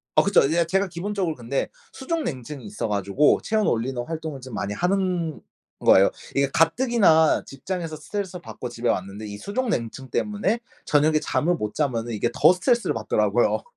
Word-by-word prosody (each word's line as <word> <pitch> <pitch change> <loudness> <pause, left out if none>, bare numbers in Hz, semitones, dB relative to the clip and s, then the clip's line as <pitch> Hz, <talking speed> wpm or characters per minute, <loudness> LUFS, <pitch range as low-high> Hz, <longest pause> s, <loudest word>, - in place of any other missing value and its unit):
아 - - +7
그쵸. 200 - +4
예 170 +1 +2
제가 195 +4 +1
기본적으로 180 -1 -2
근데 120 +3 -2 0.2
수족냉증이 150 - -4
있어 105 +2 -4
가지고 100 +8 +2
체온을 215 -1 0
올리는 120 +2 -2
활동을 160 -4 -5
좀 125 -2 -10
많이 100 0 -3
하는 180 - -1 0.4
거예요. 95 - +5 0.2
이게 140 0 +3
가뜩이나 165 - +4
직장에서 165 +3 -5
스트레스를 180 +4 -5
받고 125 - -7
집에 120 0 -2
왔는데 100 +3 -2
이 100 0 -7
수족냉증 135 - -3
때문에 210 - 0 0.3
저녁에 155 +1 +3
잠을 175 +3 0
못 105 -9 -4
자면은 120 -6 -1
이게 110 +2 0
더 - - +6
스트레스를 235 +6 +1
받더라고요. - - +1
155 Hz, 400 characters per minute, -24 LUFS, 120-190 Hz, 0.4 s, 아